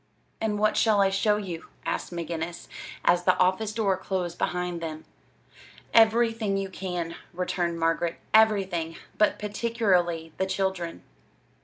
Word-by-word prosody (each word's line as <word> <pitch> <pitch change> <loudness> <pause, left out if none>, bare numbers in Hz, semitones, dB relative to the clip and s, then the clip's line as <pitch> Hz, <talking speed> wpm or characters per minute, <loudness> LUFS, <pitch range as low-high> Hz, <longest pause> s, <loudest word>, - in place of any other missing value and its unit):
"And 215 -2 0
what 215 +1 +2
shall 215 -3 +4
I 195 -1 +4
show 210 +2 +2
you?" 180 -6 -6 0.2
asked - - -2
McGinnis, 170 0 -4 0.4
as 175 0 +4
the 185 0 +3
office 185 +4 +2
door 205 -4 +1
closed 185 -2 -3
behind 180 -1 -1
them. 155 -1 -6 0.9
"Everything 225 -2 +4
you 195 0 -2
can," 180 -3 -4 0.2
returned 175 -1 -1
Margaret; 165 +1 0 0.2
"everything! 195 -7 +3 0.2
But 210 - +4
particularly 195 -7 0
the 190 - +1
children." 190 -3 -2
185 Hz, 130 wpm, -27 LUFS, 170-210 Hz, 0.9 s, shall